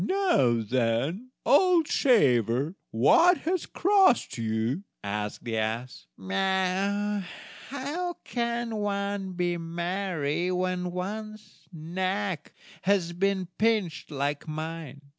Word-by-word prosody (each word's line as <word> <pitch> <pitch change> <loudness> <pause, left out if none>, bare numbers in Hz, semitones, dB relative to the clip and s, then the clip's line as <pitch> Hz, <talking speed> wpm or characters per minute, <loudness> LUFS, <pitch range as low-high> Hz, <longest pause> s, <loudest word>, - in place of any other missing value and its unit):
"Now, 140 - +2
then, 130 - 0 0.2
old 340 +1 +5
shaver, 135 - +3 0.2
what 330 - +5
has 355 +1 -1
crossed 385 - +3
you?" 115 - -1 0.2
asked 105 +1 -3
the 115 -1 -2
ass. 115 +3 -3 1.6
"How 300 +6 -3
can 235 -2 -2
one 200 -2 -2
be 175 -1 0
merry 170 -1 -2
when 180 0 -1
one's 215 +4 -6
neck 185 +1 -3 0.3
has 185 -3 +1
been 190 0 0
pinched 210 -8 +1
like 145 +1 -2
mine?" 155 -2 -6
180 Hz, 95 wpm, -27 LUFS, 140-215 Hz, 1.6 s, old